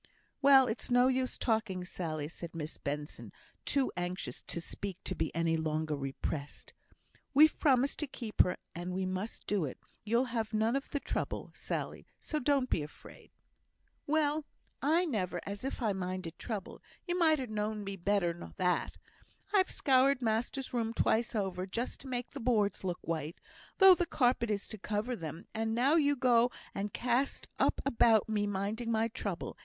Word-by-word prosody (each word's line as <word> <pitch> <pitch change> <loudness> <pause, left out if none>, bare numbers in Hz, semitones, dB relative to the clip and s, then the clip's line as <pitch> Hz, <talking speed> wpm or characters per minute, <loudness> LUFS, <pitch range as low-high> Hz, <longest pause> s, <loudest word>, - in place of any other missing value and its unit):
"Well, 270 -1 +8
it's 225 -1 -2
no 245 +1 +5
use 260 -1 0
talking, 210 -6 0
Sally," 155 -5 -3
said 165 +1 -8
Miss 155 -1 -5
Benson, 145 +1 -4 0.3
too 275 -2 +1
anxious 180 +1 -3
to - - -2
speak 190 +2 -5
to - - -2
be 160 - -1
any 165 -1 +2
longer 155 -1 -1
repressed. 140 +1 -4 0.6
"We've 305 +2 +7
promised 270 -1 +3
to 300 - -1
keep 235 -5 +1
her, 180 - +1 0.2
and 175 +1 -4
we 190 0 -1
must 185 +4 -4
do 200 -4 +1
it; 130 - -6 0.3
you'll 235 +4 +2
have 220 -2 -1
none 220 +3 +2
of 275 - -2
the 285 - -1
trouble, - - -3
Sally, - - -4
so 305 - -2
don't 275 -1 +2
be 165 - +1
afraid." 150 0 -11 0.8
"Well, 305 0 +2 0.4
I 330 +5 +3
never! 185 - -1
as 200 +2 -5
if 270 -1 -3
I 215 -3 +2
minded 185 -3 -4
trouble! 215 -4 -5 0.2
You 350 - -1
might 320 -2 +5
ha' 260 -3 -3
known 215 -1 -2
me 195 0 -4
better 195 -2 +1
nor 175 - -10
that. 180 -1 0 0.6
I've 380 -2 +4
scoured 270 0 +3
master's 240 +3 -1
room 230 -1 -1
twice 230 +1 +2
over, 190 -3 -1
just 230 +6 -3
to 270 - -9
make 245 -1 -3
the 280 - -7
boards 215 -6 +1
look 180 -2 -1
white, 160 -1 -3 0.4
though 385 -2 +10
the 350 -1 0
carpet 245 -3 +2
is 205 -1 -1
to 215 - -7
cover 215 +5 -2
them, 165 -1 -7
and 225 0 -1
now 260 +5 +4
you 290 -3 +4
go 245 -2 +4 0.2
and 200 +1 -3
cast 250 +3 0
up - - +3
about 230 -5 +4
me 210 -2 0
minding 205 +4 -2
my 225 0 +2
trouble. 200 -5 -4
220 Hz, 175 wpm, -32 LUFS, 180-255 Hz, 0.8 s, though